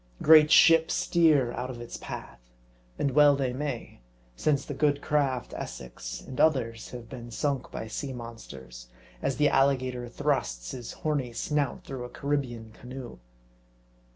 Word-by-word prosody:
Great 155 -1 +7
ships 165 +1 +6
steer 155 -8 +3
out 125 +1 -4
of 125 -2 -7
its 120 - -7
path. - - -8 0.6
And 140 - 0
well 145 +1 +6
they 130 -3 -1
may; 135 - -5 0.4
since 140 - +1
the 145 - -5
good 145 0 +2
craft 140 -5 0
Essex, - - -7
and 130 - -4
others, 120 -7 +1
have 120 -2 -9
been 120 -2 -9
sunk 135 +2 -2
by - - -6
sea 135 +5 -4
monsters, 65 - -9 0.3
as 135 - 0
the 150 -1 +4
alligator 130 -3 +1
thrusts 120 - -1
his 125 -3 -7
horny 140 -6 0
snout 145 +2 -1
through 130 -2 -6
a 125 - -7
Carribean 125 -6 -3
canoe. 125 - -9
130 Hz, 150 wpm, -28 LUFS, 120-145 Hz, 0.6 s, Great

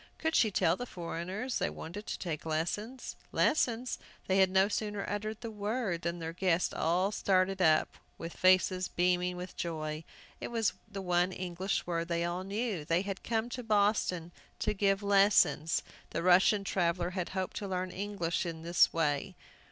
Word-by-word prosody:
Could 320 0 -1
she 220 - +5
tell 175 -4 +2
the 245 +5 -6
foreigners 185 +8 -4
they - - 0
wanted 200 +6 -8
to - - -3
take 160 -4 -4
lessons? 180 +11 -3 0.2
Lessons? 245 -4 +1 0.3
They 190 0 +2
had 190 -1 +5
no 190 +1 +4
sooner 210 -1 -3
uttered 215 +1 -3
the 230 - -5
word 210 -4 -2
than 170 0 -2
their 165 -1 -5
guests 180 -1 +1
all 180 +5 +1
started 190 -1 +1
up 155 -3 +3 0.2
with 165 0 -7
faces 185 0 +3
beaming 180 0 +1
with 180 +1 -7
joy. 155 -2 -3 0.4
It - - -4
was 230 -3 0 0.2
the 195 -1 -5
one 180 0 +2
English 185 +1 -2
word 170 -1 -2
they 170 0 0
all 175 +2 -2
knew! 200 -3 -2
They 165 +4 +1
had 195 -1 -4
come 225 0 -1
to 250 - -5
Boston 205 -6 +1 0.3
to 210 - 0
give 195 0 +1
lessons! 200 -5 +4 0.3
The 165 - -3
Russian 185 +3 +5
traveller 175 -2 0
had 180 -2 -3
hoped 185 -1 -2
to 200 - -4
learn 185 -1 -2
English 190 -4 -2
in 165 -2 -5
this 170 +1 +4
way. 165 +3 0
185 Hz, 175 wpm, -31 LUFS, 170-205 Hz, 0.4 s, she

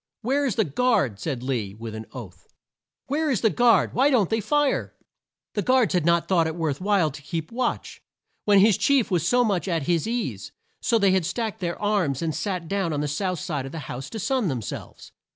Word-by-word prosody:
"Where 275 +4 +1
is 230 - -1
the 220 - +3
guard?" 145 - +1
said 125 0 -4
Lee 115 -7 -2
with 115 0 -7
an 110 0 -7
oath. 115 -8 -10 0.6
"Where 300 +3 0
is 240 -9 +1
the 220 - +3
guard? 235 -5 +3
Why 265 +4 +4
don't 230 -10 +2
they 225 - +2
fire?" 295 +4 0 0.6
The 205 - 0
guards 250 - +3
had 175 -3 +1
not 170 0 +3
thought 170 -3 +3
it 160 - -4
worth 160 -4 -2
while 190 -6 +2
to 145 - -10
keep 160 +3 -5
watch, 250 +2 -3 0.4
when 200 -2 +6
their 220 - +6
chief 265 +2 +2
was 175 -2 +1
so 245 +4 +4
much 200 -5 0
at 165 -5 0
his 170 +4 0
ease, 160 - -3 0.3
so 230 - +2
they 200 -3 +3
had 190 -1 +2
stacked 220 +2 -3
their 175 -2 -3
arms 190 -10 0
and 160 -1 -1
sat 180 -3 -3
down 195 -3 -1
on 145 - -1
the 150 - -1
south 180 +5 -2
side 150 -7 -3
of 135 - -9
a 150 -5 -7
house 130 +2 -6
to 225 - -6
sun 235 +1 0
them 130 -7 -2
selves. - - -8
185 Hz, 225 wpm, -24 LUFS, 150-225 Hz, 0.6 s, when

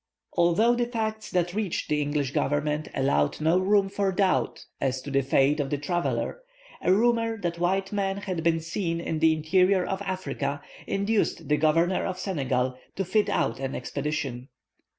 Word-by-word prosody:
Although 175 +8 +4
the 240 0 0
facts 220 -2 -3
that 175 -1 0
reached 205 -4 -2
the 150 0 +1
English 145 -2 -1
Government 150 +2 0
allowed 75 - +1
no 160 +4 +3
room 195 +1 +3
for 195 0 0
doubt 190 0 0 0.2
as 130 -1 0
to 145 - -6
the 135 0 +3
fate 135 +2 +2
of 140 -2 -1
the 145 - 0
traveller, 175 - -2 0.4
a 180 - +2
rumour 230 +2 +2
that 170 -2 -2
white 190 +2 0
men 195 -1 -1
had 185 -4 -3
been 165 -1 +2
seen 165 0 -2
in 160 -2 -2
the 160 0 +5
interior 180 +4 +3
of 195 0 -3
Africa 145 -7 -3 0.2
induced 200 +2 0
the 150 - +3
Governor 165 +4 +2
of 185 -1 -3
Senegal 130 -9 -1 0.2
to 195 - -1
fit 210 +4 +2
out 115 +3 0
an 135 0 -3
expedition. 140 -4 -3
170 Hz, 170 wpm, -26 LUFS, 145-195 Hz, 0.4 s, the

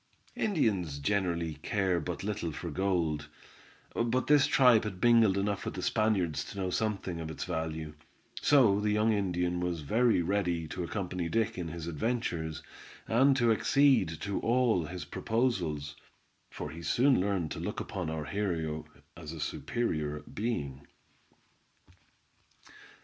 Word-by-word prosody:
Indians 100 - 0
generally 85 0 0
care 95 -2 +1
but 75 - -5
little 100 -5 -2
for 85 +2 -6
gold, 80 -4 0 0.6
but 120 +2 0
this 145 -2 +5
tribe 125 -5 +5
had 100 -4 -5
mingled 115 -5 +5
enough 100 0 -1
with - - -4
the - - -4
Spaniards 100 -8 +1
to - - -9
know 95 -2 -1
something 95 -5 -2
of 80 -1 -5
its 80 - -5
value; 80 -2 -3 0.5
so 120 -9 +5
the 105 0 0
young 105 +1 +3
Indian 90 -3 0
was 90 -2 -2
very 110 - +2
ready 90 -3 0
to 90 - -4
accompany 90 -2 -3
Dick 115 +2 0
in 90 -2 -4
his 80 0 -6
adventures, 85 -4 -2 0.4
and 135 +4 +4
to 120 -3 +3
accede 115 - +3
to 100 -1 -2
all 115 -7 +2
his 90 +3 -6
proposals, 90 - -1 0.5
for - - -6
he 85 - -8
soon 125 - +3
learned 95 -5 -1
to - - -4
look - - -4
upon - - -4
our 80 -1 -3
hero 80 -6 -2 0.3
as 80 -3 -8
a 80 - -8
superior 75 -5 -2
being. 70 - -4
95 Hz, 145 wpm, -30 LUFS, 80-110 Hz, 0.6 s, this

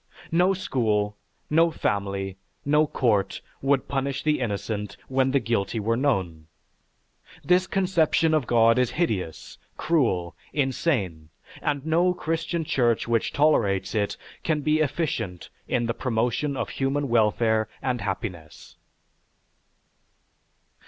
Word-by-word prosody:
No 180 +3 +3
school, 110 - 0 0.3
no 165 +2 +4
family, 100 - -2 0.3
no 150 +2 +3
court, 110 -9 +1 0.2
would 135 -1 +1
punish 140 0 -2
the 150 -1 +2
innocent 105 -2 -3
when 130 0 +2
the 140 +1 +3
guilty 115 -2 -1
were 115 +2 +1
known. 95 - -1 1.0
This 180 +1 +3
conception 170 -4 +2
of 150 -6 +1
God 115 0 +4
is 125 -2 +2
hideous, 100 - -2 0.2
cruel, 115 - +1 0.2
insane, 125 - -1 0.3
and 145 -1 -1
no 175 +3 +2
Christian 165 0 -2
church 120 -7 +1
which 115 -1 +1
tolerates 100 -11 +2
it 105 -2 -1 0.3
can 155 -2 0
be 155 +1 +2
efficient 140 - -2 0.2
in 120 -1 0
the 115 - -1
promotion 125 +4 -1
of - - -2
human 140 +1 -1
welfare 110 -1 +2
and 125 -3 -2
happiness. 95 -5 -6
125 Hz, 120 wpm, -25 LUFS, 105-150 Hz, 1.0 s, no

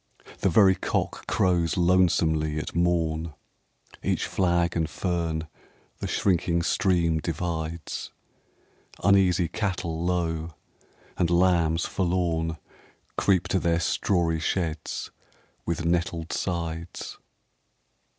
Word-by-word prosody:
The 100 - +2
very 95 +2 +6
cock - - -2
crows 85 -3 +1
lonesomely 85 -4 +3
at 75 - -4
morn 85 -2 0 0.3
— - - -46 0.3
Each - - 0
flag 85 -2 +1
and 80 -2 0
fern 85 -3 -2 0.5
the - - -3
shrinking 85 -2 +1
stream 85 -3 +2
divides 80 0 -4 0.4
— - - -25
Uneasy 95 -3 +4
cattle 85 -4 -2
low, 85 -3 -1 0.6
and 85 -2 +2
lambs 85 -2 +3
forlorn 85 -3 0 0.6
Creep 95 -3 +2
to 95 - +2
their 85 -1 +1
strawy 85 -1 +1
sheds 80 -2 -2 0.6
with 85 0 -1
nettled 85 -1 -1
sides. 85 -1 -4
85 Hz, 100 wpm, -26 LUFS, 80-90 Hz, 0.6 s, very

